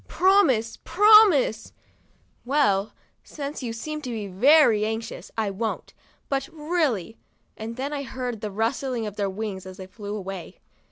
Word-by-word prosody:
Promise, 285 - +3
promise! 385 - +5 0.4
' - - -39
'Well, 230 -7 +1 0.3
since 285 0 -6
you 240 -3 -4
seem 305 +7 -5
so 225 -6 -5
very 240 +1 +5
anxious, 220 +1 -4
I 215 -3 0
won't; 220 +3 -4 0.3
but 270 -1 -2
really 300 - -1
— - - -43
" - - -43
and 225 +1 -7
then 275 +4 -4
I 285 - -3
heard 250 -4 -5
the 210 - -3
rustling 230 +3 -2
of 210 -1 -6
their 200 -2 -1
wings 190 -2 -5
as 185 0 -10
they 190 - -8
flew 205 +2 -7
away. 195 -3 -7
230 Hz, 160 wpm, -24 LUFS, 210-285 Hz, 0.4 s, promise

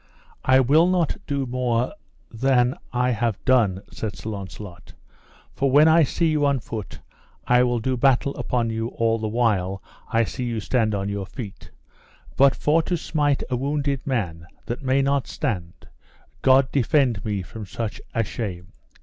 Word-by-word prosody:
I 130 0 +5
will 150 +7 +4
no 180 -2 +3 0.4
more 125 -1 0
do - - -10 0.4
than 125 +1 +3 0.2
I 125 0 +1
have 115 -3 0
done, 110 -8 +3
said 105 -4 -5
Sir 110 - -6
Launcelot, 100 -2 -9 0.6
for 140 - 0
when 145 +4 +6
I 160 +1 +6
see 160 +3 +1
you 155 -2 +2
on 140 -2 +2
foot 110 -3 -7 0.5
I 125 0 +4
will 120 -1 +2
do 130 +3 -1
battle 135 +2 +2
upon 120 -2 -1
you 115 0 -2
all 115 -1 0
the 110 - -2
while 105 -5 0 0.3
I 115 -1 +3
see 125 +3 -4
you 115 -2 -2
stand 110 0 0
on 100 0 -2
your 100 -2 -4
feet; 105 -1 -9 0.7
but 135 0 +5
for 155 +3 +2
to 175 +2 -1
smite 145 -3 0
a - - +2
wounded 140 +1 -2
man 85 -11 -2 0.2
that 120 - -4
may 135 0 +2
not 140 -1 +1
stand, 95 - -4 0.5
God 130 0 +4
defend 130 -6 +2
me 100 -3 -2
from 105 +3 -9
such 115 +4 -5
a 115 - +2
shame. 95 -4 -6
120 Hz, 165 wpm, -23 LUFS, 110-135 Hz, 0.7 s, when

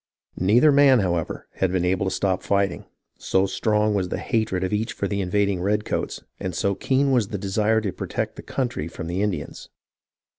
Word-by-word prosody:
Neither 115 - +5
man, 140 -2 +6
however, 85 -4 -2
had 95 -2 +1
been 90 -1 0
able 95 +2 +1
to - - -1
stop 95 -2 0
fighting, 100 -3 0 0.3
so 95 +1 +2
strong 105 +2 +1
was 95 -3 -1
the - - -2
hatred 110 -5 -1
of 95 - -2
each 110 +3 -1
for 100 - -2
the 100 0 -2
invading 100 0 0
redcoats, 105 +3 -1 0.2
and 95 -2 -4
so 100 +3 +1
keen 135 +7 +1
was 120 -6 +2
the 100 - -4
desire 105 +3 +1
to 100 -3 -2
protect - - -3
the - - -8
country 120 - -3
from 85 0 -7
the 90 +3 -2
Indians. 100 -7 -3
100 Hz, 190 wpm, -24 LUFS, 95-110 Hz, 0.3 s, man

